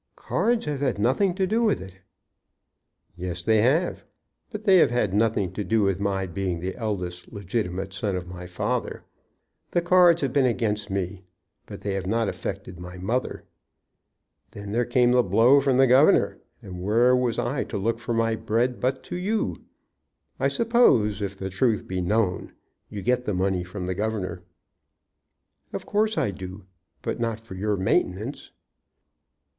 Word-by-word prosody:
"Cards 235 0 0
have 150 -2 -2
had 135 -5 0
nothing 135 - +2
to 190 0 +1
do 220 +5 +1
with 220 -3 +2
it." 95 0 -11 1.2
"Yes; 90 -1 -5
they 110 -1 +3
have. 150 +10 +1 0.5
But 215 -1 -7
they 195 -3 +6
have - - +5
had 115 -5 0
nothing 105 -3 +1
to 105 - -3
do 110 +1 +1
with 95 -2 +1
my 100 -1 -1
being 90 -1 -3
the 90 +2 -4
eldest 90 -6 -4
legitimate 95 -2 -3
son 100 0 -2
of 90 -1 -5
my 90 0 -8
father. 90 - -3 0.7
The 175 - +1
cards 175 -2 +5
have 135 - -1
been 135 -2 +4
against 105 -4 -1
me, 95 -1 -3 0.5
but - - -9
they 100 - -2
have 95 -1 -3
not 115 +2 +1
affected 95 -3 -6
my 90 +1 -9
mother. 115 +8 -2 1.1
Then 100 0 -8
there 120 +3 +1
came 120 0 +3
the 125 0 +5
blow 115 +7 +5
from 135 -2 +2
the 135 - +6
governor, 130 +4 +4 0.2
and 90 -1 -8
where 115 +6 +4
was 125 -2 0
I - - -1
to - - -5
look 115 +4 -1
for 120 -1 -3
my 115 0 +1
bread 115 +3 0
but 130 +1 -1
to - - -6
you? 205 +5 -1 0.8
I - - +2
suppose, 220 - +3
if 100 -1 -4
the 95 0 -5
truth 110 +3 +1
be 90 0 -2
known, 95 0 0 0.4
you 100 -2 -6
get 125 +2 +1
the 105 - -1
money 95 -1 0
from 90 +1 -6
the 95 - -1
governor." 95 -3 -3 1.3
"Of - - -5
course 215 +1 +1
I 100 - +1
do. 95 0 -9 0.4
But - - -3
not 115 -1 -1
for 115 -2 -12
your 100 +2 -1
maintenance." 95 +7 -1
105 Hz, 170 wpm, -25 LUFS, 95-125 Hz, 1.3 s, they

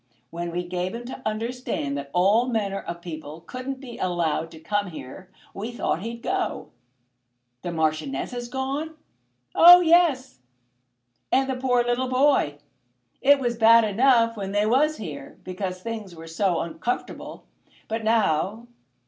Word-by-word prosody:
When 170 +1 -4
we 175 +1 -3
gave 180 +2 -3
him 240 +1 -7
to 255 - -8
understand 220 - -3
that 140 0 -5
all 200 - +3
manner 205 -5 -1
of 170 0 -7
people 155 -2 -8
couldn't 255 +6 -6
be 250 -3 -10
allowed 165 -3 -1
to 160 - -13
come 205 +4 -1
here, 170 +3 -10 0.2
we 210 +4 -5
thought 210 -7 -2
he'd 230 +2 -6
go." 380 -1 -2 0.9
"The 175 - -4
Marchioness 155 -4 -1
has 245 -1 -5
gone?" 275 +5 -3 0.6
"Oh 355 +1 +9
yes; 320 - +3 0.9
and 265 +1 +3
the 265 - -1
poor 250 -1 +2
little 245 +2 0
boy. 255 - +2 0.6
It 285 +1 +6
was 240 -3 -1
bad 230 0 +7
enough 230 +2 +3
when 195 -2 -5
they 205 +1 +2
was 290 +7 +2
here, 145 -9 -8
because 185 0 -5
things 215 -6 -6
were 165 0 -10
so 170 +2 0
uncomfortable; 170 +8 -5 0.4
but 225 +1 -3
now 220 -1 +1
220 Hz, 150 wpm, -25 LUFS, 175-255 Hz, 0.9 s, Oh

